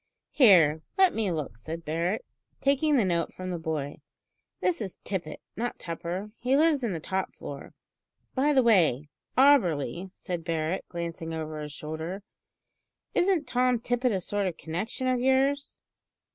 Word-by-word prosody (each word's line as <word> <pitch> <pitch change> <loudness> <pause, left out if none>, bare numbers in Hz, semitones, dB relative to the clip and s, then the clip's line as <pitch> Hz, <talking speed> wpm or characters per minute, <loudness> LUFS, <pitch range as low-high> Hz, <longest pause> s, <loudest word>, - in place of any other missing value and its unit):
"Here, 170 - +6 0.2
let 380 -2 +5
me 215 -4 0
look," 145 -9 -4
said 165 +7 -6
Barret, 170 +7 -1 0.3
taking 280 +2 +3
the 225 - +3
note 170 -2 0
from 185 0 -6
the 175 - -3
boy. 155 -3 -3 0.6
"This 345 -9 0
is 195 -4 -5
Tippet, 175 -6 -4 0.2
not 240 +2 -3
Tupper. 175 +4 -5
He 255 +3 +2
lives 305 -3 +3
in 220 -5 0
the 165 - -3
top 190 +4 -3
floor. 140 -1 -8 0.6
By 280 +3 +2
the 265 -3 +4
way, 160 - +3 0.3
Auberly," 190 - +4
said 175 -2 -5
Barret, 165 +2 -1
glancing 170 -1 -4
over 155 -1 -4
his 150 0 -6
shoulder, 160 +6 -5 0.9
"Isn't 355 -4 +2
Tom 250 -1 +2
Tippet 245 +1 0
a 195 - 0
sort 200 +2 -1
of 175 - -4
connection 185 +10 -4
of 255 -1 +2
yours?" 270 +2 +1
185 Hz, 155 wpm, -28 LUFS, 160-250 Hz, 0.9 s, Here